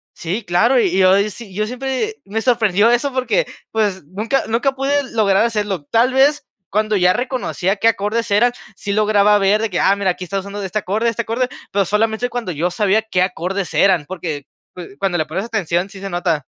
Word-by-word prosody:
Sí, 185 Hz, +7 st, -4 dB
claro, 205 Hz, +9 st, +3 dB
y 190 Hz, -5 st, +1 dB
yo, 185 Hz, 0 st, +5 dB
sí 210 Hz, -2 st, -11 dB
yo 210 Hz, +3 st, -1 dB
siempre, 265 Hz, -, -3 dB
me 215 Hz, +3 st, -3 dB
sorprendió 220 Hz, -3 st, +3 dB
eso 255 Hz, +3 st, +1 dB
porque, 260 Hz, -, +1 dB, 0.3 s
pues, 205 Hz, -5 st, -1 dB
nunca 215 Hz, -, -1 dB
nunca 245 Hz, +5 st, +1 dB
pude 275 Hz, 0 st, -1 dB
lograr 210 Hz, -1 st, +3 dB
hacerlo. 205 Hz, -8 st, -2 dB
Tal 235 Hz, -, +2 dB
vez, 280 Hz, +2 st, +3 dB, 0.2 s
cuando 215 Hz, +1 st, 0 dB
ya 180 Hz, 0 st, +4 dB
reconocía 240 Hz, -5 st, -2 dB
qué 225 Hz, -, +2 dB
acordes 225 Hz, +1 st, 0 dB
eran, 235 Hz, +5 st, +4 dB, 0.2 s
sí 200 Hz, -, -5 dB
lograba 210 Hz, 0 st, +4 dB
ver 205 Hz, +2 st, +2 dB
de 225 Hz, -, -1 dB
que, 180 Hz, -, -2 dB
ah, 195 Hz, -, +4 dB
mira, 200 Hz, -2 st, +1 dB
aquí 180 Hz, -, -6 dB
está 195 Hz, +2 st, -2 dB
usando 200 Hz, +1 st, -7 dB
de 200 Hz, -, -4 dB
este 215 Hz, +3 st, -2 dB
acorde 215 Hz, +4 st, 0 dB
este 230 Hz, 0 st, -2 dB
acorde, 235 Hz, +3 st, -1 dB, 0.2 s
pero, 200 Hz, -1 st, +1 dB
solamente 220 Hz, +4 st, 0 dB
cuando 240 Hz, -7 st, -4 dB
yo 170 Hz, +3 st, -1 dB
sabía 205 Hz, +2 st, +2 dB
qué 200 Hz, -5 st, -1 dB
acordes 185 Hz, +1 st, -2 dB
eran, 185 Hz, -6 st, +3 dB
porque, 160 Hz, -5 st, -5 dB, 0.3 s
pues, 180 Hz, -2 st, -9 dB
cuando 190 Hz, -3 st, 0 dB
le 155 Hz, -, 0 dB
pones 185 Hz, +7 st, -4 dB
atención, 190 Hz, -5 st, -1 dB
sí 195 Hz, -, -11 dB
se 195 Hz, -, -5 dB
nota. 175 Hz, -5 st, -1 dB
205 Hz, 205 wpm, -19 LUFS, 185-230 Hz, 0.3 s, yo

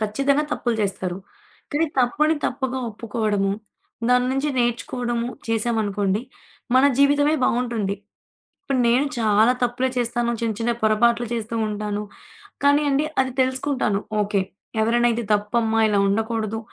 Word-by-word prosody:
ఖచ్చితంగా 275 Hz, +7 st, +1 dB
తప్పులు 240 Hz, -2 st, -1 dB
జేస్తారు. 190 Hz, -3 st, -2 dB, 0.5 s
కానీ 320 Hz, +3 st, +1 dB
తప్పని 295 Hz, +6 st, +3 dB
తప్పుగా 260 Hz, 0 st, -2 dB
ఒప్పుకోవడము. 210 Hz, -3 st, -1 dB, 0.6 s
దాన్నుంచి 255 Hz, +3 st, +2 dB
నేర్చుకోవడము 240 Hz, 0 st, -1 dB, 0.2 s
చేశామనుకోండి. 215 Hz, -2 st, 0 dB, 0.5 s
మన 260 Hz, +1 st, +6 dB
జీవితమే 290 Hz, +2 st, +4 dB
బావుంటుంది. 230 Hz, -5 st, 0 dB, 0.7 s
ఇప్పుడు 275 Hz, -8 st, -1 dB
నేను 250 Hz, +5 st, +3 dB
చాలా 220 Hz, +2 st, +4 dB
తప్పులే 245 Hz, +2 st, 0 dB
చేస్తాను. 240 Hz, 0 st, 0 dB
చిన్న 230 Hz, -1 st, 0 dB
చిన్న 235 Hz, +1 st, +1 dB
పొరపాట్లు 235 Hz, +2 st, +3 dB
చేస్తూ 230 Hz, 0 st, -3 dB
ఉంటాను. 210 Hz, 0 st, -3 dB, 0.6 s
కానీ 285 Hz, +1 st, +5 dB
అండి 280 Hz, +2 st, +2 dB, 0.2 s
అది 260 Hz, 0 st, -2 dB
తెలుసుకుంటాను. 260 Hz, -5 st, 0 dB, 0.2 s
ఓకే. 205 Hz, -1 st, 0 dB, 0.4 s
ఎవరైనైతే 235 Hz, +1 st, +2 dB
తప్పమ్మా 225 Hz, +2 st, +1 dB
ఇలా 205 Hz, -2 st, +2 dB
ఉండకూడదు, 220 Hz, +1 st, -1 dB
235 Hz, 115 wpm, -23 LUFS, 215-255 Hz, 0.7 s, మన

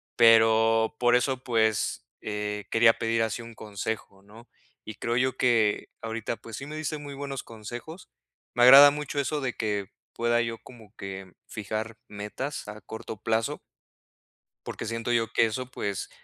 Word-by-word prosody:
pero, 115 Hz, 0 st, +5 dB
por 120 Hz, 0 st, +4 dB
eso, 130 Hz, +1 st, 0 dB
pues, 110 Hz, -3 st, 0 dB
eh, 105 Hz, -1 st, -4 dB
quería 115 Hz, 0 st, +5 dB
pedir 115 Hz, 0 st, 0 dB
así 110 Hz, +1 st, -2 dB
un 115 Hz, 0 st, -11 dB
consejo, 105 Hz, -2 st, -6 dB
¿no?, 110 Hz, +4 st, -16 dB, 0.4 s
y 110 Hz, -, -7 dB
creo 120 Hz, +2 st, -1 dB
yo 130 Hz, +1 st, +1 dB
que 115 Hz, -4 st, +2 dB
ahorita 115 Hz, 0 st, -4 dB
pues 115 Hz, -, -9 dB
sí 135 Hz, -, -6 dB
me 150 Hz, +1 st, -7 dB
diste 155 Hz, 0 st, -3 dB
muy 145 Hz, -1 st, -8 dB
buenos 140 Hz, -1 st, -5 dB
consejos, 120 Hz, -, -9 dB, 0.5 s
me 120 Hz, -, +4 dB
agrada 135 Hz, +3 st, +11 dB
mucho 145 Hz, 0 st, -3 dB
eso 140 Hz, +2 st, -1 dB
de 130 Hz, -3 st, -2 dB
que 105 Hz, -3 st, -3 dB, 0.2 s
pueda 120 Hz, 0 st, +1 dB
yo 115 Hz, -1 st, -3 dB
como 110 Hz, -3 st, -16 dB
que 95 Hz, -1 st, -8 dB
fijar 110 Hz, +1 st, -5 dB
metas 105 Hz, +8 st, -5 dB
a 105 Hz, +1 st, -8 dB
corto 110 Hz, 0 st, -8 dB
plazo 115 Hz, 0 st, 0 dB, 1.1 s
porque -, -, -5 dB
siento 115 Hz, +2 st, -3 dB
yo 115 Hz, -1 st, +1 dB
que 115 Hz, -, +4 dB
eso, 120 Hz, +3 st, -3 dB
pues, 100 Hz, -5 st, -4 dB
115 Hz, 165 wpm, -27 LUFS, 110-125 Hz, 1.1 s, agrada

